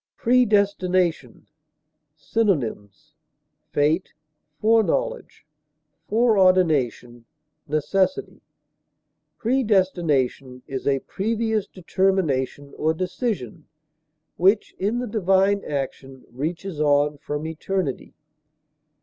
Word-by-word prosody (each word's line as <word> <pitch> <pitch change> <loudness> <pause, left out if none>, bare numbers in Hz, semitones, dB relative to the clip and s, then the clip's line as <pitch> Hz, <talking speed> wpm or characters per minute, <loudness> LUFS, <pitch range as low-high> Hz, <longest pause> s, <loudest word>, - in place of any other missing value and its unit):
PREDESTINATION. 200 - +1 0.7
Synonyms: 145 - -2 0.6
fate, 155 +5 0 0.5
foreknowledge, 220 -8 0 0.6
foreordination, 185 - +2 0.4
necessity. 190 - -1 1.0
Predestination 175 - 0
is 135 -2 -5
a 135 -1 +2
previous 220 +1 -2
determination 165 -7 -1
or 160 +1 +1
decision, 185 - -4 0.7
which, 195 +4 +2
in 210 +5 0
the 245 0 -3
divine 200 -1 +2
action, 135 -2 -5
reaches 160 +6 -4
on 145 0 +2
from 150 +2 -4
eternity. 160 -1 -3
180 Hz, 70 wpm, -23 LUFS, 145-200 Hz, 1.0 s, foreordination